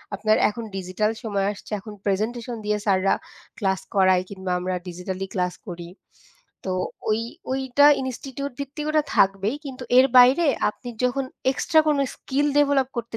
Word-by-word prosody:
আপনার 215 +2 +2
এখন 230 +3 -6
ডিজিটাল 195 +3 -1
সময় 200 -3 -1
আসছে 205 - -12
এখন 210 +2 -10
প্রেজেন্টেশন 230 +4 -1
দিয়ে 210 0 +1
স্যাররা 195 -1 +3 0.4
ক্লাস 190 -2 0 0.2
করায় 185 -2 +4
কিংবা 190 -2 -5
আমরা 185 +1 -2
ডিজিটালি 185 +2 -5
ক্লাস 180 -1 -1
করি। 170 -1 -7 0.8
তো - - 0 0.4
ওই 215 - +2 0.3
ওইটা 265 +2 +3 0.2
ইনস্টিটিউট 265 +2 -5
ভিত্তিক 290 +2 -5
ওটা 305 0 +3
থাকবেই 195 +6 +2
কিন্তু 260 -2 -7 0.2
এর 265 - +7
বাইরে 260 +7 +7 0.2
আপনি 245 +4 -7 0.2
যখন 260 +2 0 0.3
এক্সট্রা 315 +4 +3
কোনো 295 -2 +2
স্কিল 285 +2 -1
ডেভেলপ 280 -3 +3
করতে 230 -1 -4
220 Hz, 150 wpm, -24 LUFS, 190-265 Hz, 0.8 s, এর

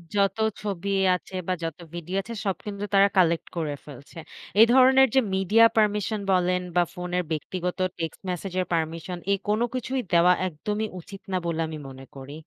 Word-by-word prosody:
যত 200 0 +2 0.2
ছবি 200 -2 -4 0.3
আছে 185 - -9
বা 185 - +1
যত 165 -2 -4 0.2
ভিডিও 175 +3 -4
আছে 230 +4 -8
সব 195 - 0
কিন্তু 200 -1 -5
তারা 200 0 +6
কালেক্ট 170 -2 +3
করে 155 -3 -2
ফেলছে। 140 +2 -13 0.4
এ - - +10
ধরনের 265 +1 +6
যে - - +7 0.2
মিডিয়া 210 +4 +5
পারমিশন 210 0 +1
বলেন 180 0 +2
বা 175 - +5
ফোনের 180 0 -2
ব্যক্তিগত 180 +4 -3 0.2
টেক্সট 165 -1 -4
মেসেজের 185 +1 -2
পারমিশন 165 +2 -2
এ - - +5
কোন 210 +2 +1
কিছুই 255 +1 -2
দেওয়া 175 +1 +6
একদমই 210 +6 -3
উচিত 195 +3 -11
না 185 - +1
বলে 165 -1 -2
আমি 155 - -6
মনে 135 0 -11
করি। 135 +1 -9
180 Hz, 175 wpm, -25 LUFS, 165-205 Hz, 0.4 s, এ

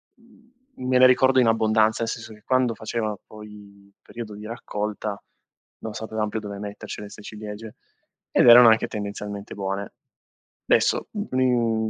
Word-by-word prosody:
mhmm, 240 - -14
me 130 0 +3
le 130 - +7
ricordo 130 +1 +4
in 120 - +3
abbondanza, 110 0 +2
nel 115 - -2
senso 110 -1 -7
che, 105 - -18
quando 130 -2 +2
faceva 110 -1 -3
poi 105 -2 -14
periodo 110 -3 -9
di 105 +1 -10
raccolta, 105 -2 -5 0.6
non 110 - -6
sapevam 110 -1 -3
più 110 - -3
dove 100 -1 -7
mettercele 105 0 -7
'ste 105 - -12
ciliegie, 105 +1 -9 0.6
ed - - +4
erano 120 0 +10
anche 110 0 +3
tendenzialmente 105 0 -6
buone. 100 0 -4 0.8
Adesso, - - +2
mhmm, 125 - 0
110 Hz, 145 wpm, -24 LUFS, 105-120 Hz, 0.8 s, erano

